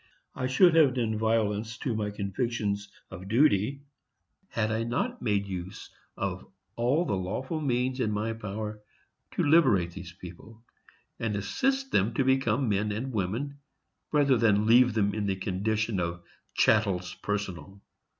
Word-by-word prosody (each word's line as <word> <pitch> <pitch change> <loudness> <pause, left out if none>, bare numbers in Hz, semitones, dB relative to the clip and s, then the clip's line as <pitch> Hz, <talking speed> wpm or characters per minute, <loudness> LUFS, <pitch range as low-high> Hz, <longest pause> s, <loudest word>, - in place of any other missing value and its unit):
_ - - -34 0.3
I 130 - -2
should 165 +7 +5
have 150 -6 +5
done 115 -3 0
violence 110 0 0
to 125 +1 -2
my 105 -1 -1
convictions 105 0 -2 0.2
of 95 0 -8
duty, 125 +2 +2 0.7
had 110 -1 -1
I 110 0 0
not 190 - -2
made 100 -3 0
use 95 -1 -7 0.3
of 95 -1 -3 0.3
all 130 +9 +1
the - - -1
lawful 130 - -3
means 130 -1 0
in 115 - +1
my 105 +2 -1
power 105 0 -6 0.5
to - - +1
liberate 130 - +4
those 85 -1 -8
people, 90 +6 -12 0.6
and 110 -3 -1
assist 270 - -1
them 110 +5 +2
to 135 - +2
become 130 -1 +2
men 105 0 0
and 125 +5 -4
women, 115 +9 -2 0.5
rather 140 -4 +4
than 105 -2 +3
leave 120 +1 +5
them 100 -2 +2
in 105 -2 -2
the 95 - 0
condition 105 +2 -1
of 85 0 -3 0.3
chattels 95 -5 +2
personal. 100 -1 -4
110 Hz, 150 wpm, -28 LUFS, 100-125 Hz, 0.7 s, should